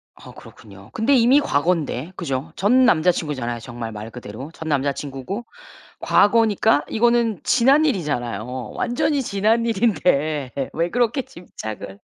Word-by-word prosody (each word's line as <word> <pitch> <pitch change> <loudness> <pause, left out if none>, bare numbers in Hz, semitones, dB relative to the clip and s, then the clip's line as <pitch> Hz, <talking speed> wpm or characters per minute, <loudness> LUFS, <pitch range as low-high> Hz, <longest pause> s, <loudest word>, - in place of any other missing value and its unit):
아 - - -13
그렇군요. 100 0 -15
근데 225 +6 +1
이미 250 +4 +5
과거인데. 160 - -1
그죠? 140 -2 -4
전 250 +7 +4
남자 180 -6 +4
친구잖아요, 130 -8 -4
정말 120 -1 -7
말 105 +1 -7
그대로. 120 +3 -9
전 160 - -8
남자 140 -2 +1
친구고 145 - -6 0.6
과거니까 205 -9 +3
이거는 235 -4 +1
지난 270 +5 +4
일이잖아요. 125 - -2 0.3
완전히 275 +4 0
지난 220 +1 +1
일인데 175 - +1 0.2
왜 170 +2 0
그렇게 245 +4 +1
집착을. 110 - -9
170 Hz, 315 characters per minute, -21 LUFS, -, 0.6 s, 이미